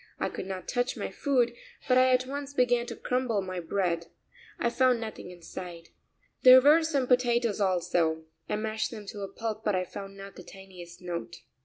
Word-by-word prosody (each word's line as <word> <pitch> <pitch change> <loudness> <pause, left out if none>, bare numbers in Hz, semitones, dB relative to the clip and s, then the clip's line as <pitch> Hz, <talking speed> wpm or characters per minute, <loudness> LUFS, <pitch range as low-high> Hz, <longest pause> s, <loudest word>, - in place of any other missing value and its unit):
I - - -1
could 185 - -6
not 190 -1 -6
touch 245 0 -1
my - - -4
food, 250 -5 +1 0.3
but 255 - +4
I 255 0 +5
at 255 0 +3
once 280 +1 -6
began 245 -2 +2
to - - -6
crumble 250 -4 -1
my 185 -1 -4
bread. 170 -1 -1 0.5
I 235 - 0
found 255 -1 +3
nothing 220 -5 -7
inside. 175 -1 -9 0.5
There 255 0 +10
were 295 +5 +6
some 295 -5 0
potatoes 240 -4 +2
also; 170 -4 +1 0.3
I - - 0
mashed 220 +1 -2
them 215 -3 -9
to 205 +1 -7
a 195 - -3
pulp, 220 -1 -4
but 210 -3 +1
I 185 0 0
found 195 +2 -9
not 195 0 -10
the 180 - -9
tiniest 180 -2 -12
note. 175 -1 -6
215 Hz, 190 wpm, -28 LUFS, 185-250 Hz, 0.5 s, There